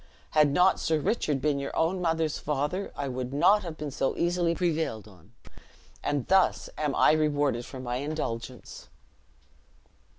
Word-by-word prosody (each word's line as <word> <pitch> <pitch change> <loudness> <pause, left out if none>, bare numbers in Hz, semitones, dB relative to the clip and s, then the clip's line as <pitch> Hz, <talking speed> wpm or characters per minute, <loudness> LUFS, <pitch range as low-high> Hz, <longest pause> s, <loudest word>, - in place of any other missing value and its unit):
Had 150 -1 +4
not 180 +5 +4
Sir 160 -1 +1
Richard 150 - 0
been 145 0 +1
your 140 - -5
own 175 +3 +1
mother's 160 -2 0
father, 150 +7 -2
I 140 - -3
would 125 -1 -4
not 200 +9 +4
have 170 -4 -7
been 150 -1 -5
so 135 - -1
easily 175 -1 +1
prevailed 160 - -1
on; 95 +1 -19 0.7
and 145 -4 -1
thus 190 -1 +2
am 150 -3 -1
I - - +5
rewarded 145 -5 +1
for 130 - -8
my 125 -1 -3
indulgence." 130 -4 -5
150 Hz, 155 wpm, -28 LUFS, 135-165 Hz, 0.7 s, I